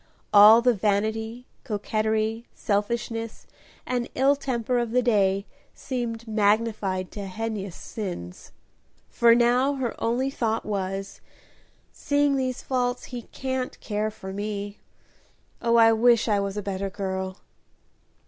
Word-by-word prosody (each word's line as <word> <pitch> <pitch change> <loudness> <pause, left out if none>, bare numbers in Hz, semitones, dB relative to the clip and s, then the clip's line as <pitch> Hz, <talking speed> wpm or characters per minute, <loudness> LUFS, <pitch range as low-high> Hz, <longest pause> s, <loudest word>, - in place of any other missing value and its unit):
All 215 +3 +9
the 250 0 +5
vanity, 220 +3 -1 0.2
coquetry, 220 +2 -1
selfishness, 225 +2 -2 0.4
and 245 -1 -2
ill 275 +2 +4
temper 250 -3 -1
of 240 -1 -1
the 250 0 +3
day 200 -4 +2 0.3
seemed 235 -3 -4
magnified 210 -3 0
to 200 -2 -6
heinous 200 -2 -4
sins, 175 - -7 0.6
for 235 -1 +5
now 245 +4 +3
her 255 -3 -2
only 250 +4 0
thought 225 -4 -1
was, 195 -1 -4 0.7
"seeing 285 -1 +1
these 255 -2 -2
faults, 250 -1 -1
he 245 - -4
can't 260 -1 -3
care 215 0 -2
for 190 -2 -9
me. 205 0 -4 0.8
Oh, 235 0 +2
I 225 -1 +7
wish 235 +1 +4
I 210 -2 +2
was 200 0 -3
a 210 - -3
better 195 0 -3
girl!" 190 -1 -4
220 Hz, 125 wpm, -25 LUFS, 205-240 Hz, 0.8 s, All